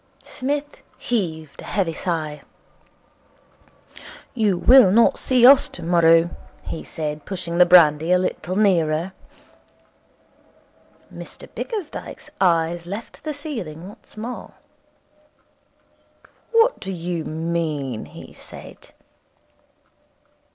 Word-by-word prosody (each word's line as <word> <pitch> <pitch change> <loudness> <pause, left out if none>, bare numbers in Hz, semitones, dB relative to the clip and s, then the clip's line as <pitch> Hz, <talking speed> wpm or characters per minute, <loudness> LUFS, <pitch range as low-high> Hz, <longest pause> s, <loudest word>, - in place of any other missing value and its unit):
Psmith 285 +2 -4 0.2
heaved 170 - -3
a - - -10
heavy 185 -5 -1
sigh. 155 -4 -3 1.9
'You 210 -6 +1
will 250 +2 +7
not 230 +3 +4
see 250 -2 +3
us 270 +1 +8
tomorrow,' 170 -1 +3 0.3
he 165 - -6
said, 150 -1 -5
pushing 175 -3 -4
the 180 - +7
brandy 160 -2 +5
a 180 - +6
little 180 -1 -3
nearer. 175 -3 +1 2.0
Mr - - -10
Bickersdyke's 415 -10 -6
eyes 170 -1 +1
left 205 +5 -8
the 310 - -3
ceiling 190 - -7
once 210 - -18
more. 240 +3 -7 2.0
'What 460 +2 +3
do 195 - -6
you 175 -2 -4
mean?' 155 -7 -3
he - - -12
said. - - -12
175 Hz, 95 wpm, -22 LUFS, 165-225 Hz, 2.0 s, us